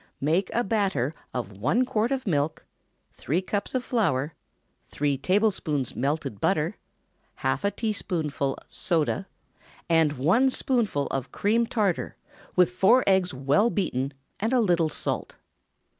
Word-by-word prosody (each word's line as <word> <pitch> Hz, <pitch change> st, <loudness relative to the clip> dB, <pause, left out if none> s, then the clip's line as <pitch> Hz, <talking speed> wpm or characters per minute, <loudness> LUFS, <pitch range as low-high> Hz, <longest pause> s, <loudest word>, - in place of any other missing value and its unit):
Make 165 Hz, +7 st, +1 dB
a 240 Hz, -, +2 dB
batter 190 Hz, -, 0 dB, 0.2 s
of 120 Hz, -5 st, -4 dB
one 145 Hz, -, +1 dB
quart 225 Hz, +1 st, 0 dB
of 265 Hz, -1 st, -1 dB
milk, 155 Hz, -4 st, -1 dB, 0.5 s
three 155 Hz, +8 st, -1 dB
cups 205 Hz, +5 st, -3 dB
of 255 Hz, -, 0 dB
flour, 160 Hz, -, 0 dB, 0.5 s
three 145 Hz, -1 st, 0 dB
tablespoonfuls 160 Hz, -, 0 dB
melted 140 Hz, -5 st, -2 dB
butter, 170 Hz, +1 st, +1 dB, 0.7 s
half -, -, +1 dB
a 200 Hz, -, +3 dB
teaspoonful 160 Hz, -, -2 dB
soda, 170 Hz, +3 st, -1 dB, 0.6 s
and 160 Hz, -3 st, +3 dB
one 180 Hz, -, +3 dB
spoonful 230 Hz, -, 0 dB
of 135 Hz, -1 st, -3 dB
cream 230 Hz, +3 st, +1 dB
tartar, 205 Hz, -7 st, 0 dB, 0.4 s
with 180 Hz, -1 st, +4 dB
four 195 Hz, +8 st, +4 dB
eggs 190 Hz, -2 st, +3 dB
well 140 Hz, -, +2 dB
beaten, 140 Hz, -, -1 dB, 0.3 s
and 225 Hz, +5 st, 0 dB
a 255 Hz, -, +4 dB
little 175 Hz, -7 st, +2 dB
salt. -, -, -3 dB
175 Hz, 130 wpm, -26 LUFS, 145-215 Hz, 0.7 s, with